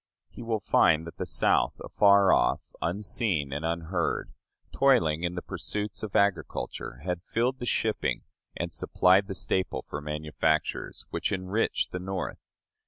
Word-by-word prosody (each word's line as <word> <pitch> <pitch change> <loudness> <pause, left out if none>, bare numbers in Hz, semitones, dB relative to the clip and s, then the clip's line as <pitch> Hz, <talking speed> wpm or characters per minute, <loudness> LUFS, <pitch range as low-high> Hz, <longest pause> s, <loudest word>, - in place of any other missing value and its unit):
He - - -10
will 115 -2 -1
find 80 -4 +3
that 85 - -10
the - - -3
South, - - +2
afar 100 -2 +5
off, - - +1
unseen 90 - -1
and 75 +2 -3
unheard, 85 +1 -2 0.4
toiling 90 - +3
in 90 0 -1
the 90 - -4
pursuits 105 0 -4
of 105 -3 -6
agriculture, 100 -9 -1
had 90 -2 -2
filled 125 +7 -1
the 120 - -4
shipping 110 -2 0 0.3
and - - -3
supplied 95 +2 +3
the 95 - -5
staple 95 +1 -1
for 75 - -5
manufactures, 75 +1 -1
which - - -1
enriched 95 +3 -1
the 90 - -3
North. 95 0 -4
95 Hz, 145 wpm, -28 LUFS, 80-105 Hz, 0.4 s, afar